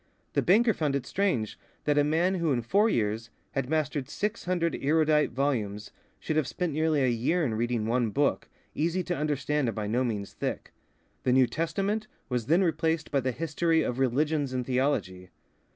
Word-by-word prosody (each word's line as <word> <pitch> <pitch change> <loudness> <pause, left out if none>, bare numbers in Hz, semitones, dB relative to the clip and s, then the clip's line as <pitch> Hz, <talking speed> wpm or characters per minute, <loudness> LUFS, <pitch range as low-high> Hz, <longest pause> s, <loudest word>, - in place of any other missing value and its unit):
The - - +2
banker 220 +5 +4
found 150 -6 -1
it 140 - -2
strange 155 - -1 0.2
that 150 0 +2
a - - +4
man 165 +5 +2
who 170 -4 0
in 120 -3 0
four 205 - +3
years 110 - -1 0.2
had 135 -2 -2
mastered 150 -3 -1
six 210 +7 -3
hundred 175 -2 0
erudite 150 +1 +3
volumes, 110 -6 -2 0.3
should 155 - -2
have 155 -4 +1
spent 175 0 -2
nearly 155 -2 +2
a - - +3
year 130 +9 +1
in 120 - -1
reading 115 0 -1
one 120 0 +1
book, 140 +6 0 0.2
easy 170 +4 0
to 175 -1 -2
understand 150 -3 0
and - - -4
by 105 -2 -3
no 120 +5 +1
means 105 -5 -3
thick. - - -4 0.5
The 125 - +2
New 130 0 +6
Testament 195 - -2 0.2
was 125 -3 -2
then 170 +5 +4
replaced 160 -1 0
by 140 - +2
the 130 0 -1
history 165 +3 +1
of 125 +1 -2
religions 140 +2 +1
and 125 -1 -2
theology. 125 -9 -1
145 Hz, 185 wpm, -28 LUFS, 125-165 Hz, 0.5 s, New